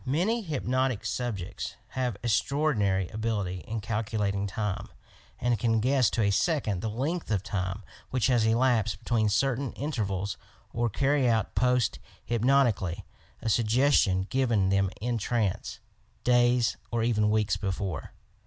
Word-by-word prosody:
Many 180 Hz, -, +1 dB
hypnotic 130 Hz, -, -1 dB
subjects 110 Hz, -6 st, -3 dB
have 125 Hz, -5 st, -2 dB
estraordinary 110 Hz, -, +1 dB
ability 105 Hz, -4 st, -2 dB
in 110 Hz, 0 st, -3 dB
calculating 105 Hz, -2 st, -1 dB
time, 105 Hz, 0 st, -3 dB, 0.5 s
and 120 Hz, -2 st, +1 dB
can 115 Hz, 0 st, +2 dB
guess 130 Hz, 0 st, +3 dB
to 115 Hz, -, 0 dB
a 100 Hz, -, +3 dB
second 110 Hz, -, 0 dB
the 110 Hz, -, -2 dB
length 145 Hz, +10 st, -2 dB
of 100 Hz, -4 st, 0 dB
time 95 Hz, +1 st, -3 dB, 0.3 s
which 125 Hz, -3 st, 0 dB
has 125 Hz, -3 st, +3 dB
elapsed 115 Hz, 0 st, +2 dB
between 110 Hz, -3 st, +1 dB
certain 135 Hz, +4 st, 0 dB
intervals 100 Hz, -9 st, -2 dB, 0.4 s
or 120 Hz, 0 st, 0 dB
carry 135 Hz, +3 st, +2 dB
out 110 Hz, -3 st, +1 dB
"post 125 Hz, -3 st, +2 dB, 0.3 s
hypnotically" 120 Hz, -7 st, +1 dB, 0.4 s
a -, -, -2 dB
suggestion 110 Hz, -3 st, +3 dB
given 115 Hz, -8 st, +2 dB
them 100 Hz, 0 st, +2 dB
in 120 Hz, +1 st, -1 dB
trance, 105 Hz, -2 st, -1 dB, 0.2 s
— -, -, -37 dB
days 120 Hz, -1 st, +3 dB
or 115 Hz, -1 st, 0 dB
even 105 Hz, -3 st, +2 dB
weeks 105 Hz, -3 st, +2 dB
before. 95 Hz, -4 st, -3 dB
115 Hz, 135 wpm, -28 LUFS, 100-125 Hz, 0.5 s, guess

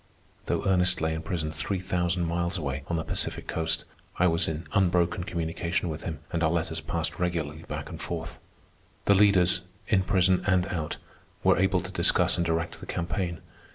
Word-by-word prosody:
Though -, -, 0 dB
Ernest 90 Hz, -1 st, +3 dB
lay 80 Hz, 0 st, 0 dB
in 80 Hz, -, -3 dB
prison 80 Hz, -1 st, -2 dB
three 80 Hz, +5 st, -2 dB
thousand 90 Hz, -1 st, 0 dB
miles 85 Hz, +2 st, -1 dB
away, 70 Hz, -4 st, -2 dB
on 85 Hz, -, -1 dB
the 80 Hz, -, -1 dB
Pacific -, -, -2 dB
Coast, 80 Hz, -1 st, -1 dB, 0.3 s
I 90 Hz, -, +4 dB
was 85 Hz, 0 st, +3 dB
in 80 Hz, 0 st, -3 dB
unbroken 90 Hz, -2 st, +2 dB
communication 85 Hz, +1 st, -2 dB
with 80 Hz, 0 st, -4 dB
him, 80 Hz, -2 st, -5 dB
and 85 Hz, -, 0 dB
our 80 Hz, -, +4 dB
letters 80 Hz, -1 st, -1 dB
passed 85 Hz, -1 st, -3 dB
regularly 80 Hz, -3 st, -2 dB
back -, -, -4 dB
and -, -, -7 dB
forth. 80 Hz, -1 st, -4 dB, 0.7 s
The 100 Hz, -, +6 dB
leaders, 95 Hz, -3 st, +5 dB, 0.3 s
in 95 Hz, -3 st, +4 dB
prison 95 Hz, -1 st, +3 dB
and 95 Hz, -2 st, +3 dB
out, 80 Hz, -4 st, -3 dB, 0.5 s
were -, -, +5 dB
able 95 Hz, -1 st, +3 dB
to -, -, -7 dB
discuss -, -, +3 dB
and 85 Hz, -, +1 dB
direct 85 Hz, 0 st, -1 dB
the -, -, -10 dB
campaign. 85 Hz, 0 st, -2 dB
85 Hz, 185 wpm, -28 LUFS, 80-90 Hz, 0.7 s, The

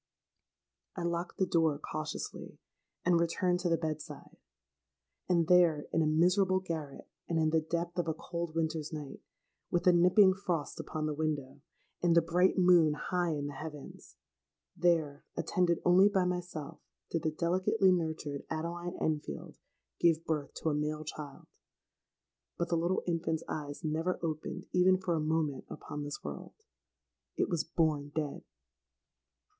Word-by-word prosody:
I 175 Hz, -, -4 dB
locked 170 Hz, +1 st, -2 dB
the 190 Hz, -, +2 dB
door 165 Hz, -4 st, +2 dB
cautiously, 155 Hz, -, -6 dB, 0.5 s
and 175 Hz, -1 st, +4 dB
returned 175 Hz, +2 st, +1 dB
to 180 Hz, -1 st, 0 dB
the 165 Hz, -, +3 dB
bed 155 Hz, -2 st, -2 dB
side. -, -, -11 dB, 0.9 s
And 170 Hz, -3 st, +3 dB
there—in 165 Hz, -3 st, +4 dB
a 155 Hz, -, +2 dB
miserable 180 Hz, +4 st, +3 dB
garret, 160 Hz, -6 st, -6 dB, 0.2 s
and 165 Hz, -, +1 dB
in 155 Hz, -1 st, +2 dB
the 160 Hz, 0 st, +3 dB
depth 170 Hz, +2 st, -3 dB
of 175 Hz, -, 0 dB
a 160 Hz, -, -1 dB
cold 170 Hz, 0 st, -5 dB
winter's 160 Hz, -2 st, -1 dB
night,—with 155 Hz, +3 st, -6 dB
a 180 Hz, -, +7 dB
nipping 185 Hz, +3 st, +6 dB
frost 180 Hz, -6 st, -3 dB
upon 155 Hz, -1 st, -3 dB
the 155 Hz, -, -1 dB
window, 145 Hz, -3 st, -3 dB, 0.4 s
and 170 Hz, -1 st, +3 dB
the 170 Hz, -, +7 dB
bright 175 Hz, +3 st, +2 dB
moon 175 Hz, -4 st, +6 dB
high 175 Hz, +1 st, -1 dB
in 145 Hz, -1 st, -3 dB
the 145 Hz, -, -4 dB
heavens,—there, 150 Hz, +1 st, -4 dB
attended 180 Hz, -3 st, +1 dB
only 185 Hz, +3 st, +6 dB
by 190 Hz, -3 st, +2 dB
myself, 180 Hz, -5 st, -4 dB, 0.3 s
did 165 Hz, -, 0 dB
the 160 Hz, -, +1 dB
delicately 185 Hz, +5 st, +2 dB
nurtured 160 Hz, -5 st, -2 dB
Adeline 170 Hz, +2 st, -4 dB
Enfield 155 Hz, -2 st, -3 dB, 0.4 s
give 165 Hz, -1 st, +3 dB
birth 150 Hz, -3 st, -2 dB
to 160 Hz, -, -1 dB
a -, -, 0 dB
male 150 Hz, +1 st, -2 dB
child. 145 Hz, -2 st, -8 dB, 1.1 s
But 170 Hz, -1 st, -1 dB
the 170 Hz, -, +2 dB
little 170 Hz, +3 st, 0 dB
infant's 165 Hz, -2 st, -1 dB
eyes 145 Hz, +1 st, -5 dB
never 160 Hz, +3 st, 0 dB
opened 155 Hz, -2 st, -3 dB
even 185 Hz, +1 st, +5 dB
for 185 Hz, -2 st, -1 dB
a 165 Hz, -, +1 dB
moment 155 Hz, -3 st, -1 dB
upon 150 Hz, -1 st, -7 dB
this 145 Hz, 0 st, -6 dB
world: -, -, -7 dB, 0.8 s
it -, -, +1 dB
was 170 Hz, -3 st, 0 dB
born 155 Hz, -3 st, 0 dB
dead! 150 Hz, -3 st, -3 dB
165 Hz, 150 wpm, -32 LUFS, 155-175 Hz, 1.1 s, a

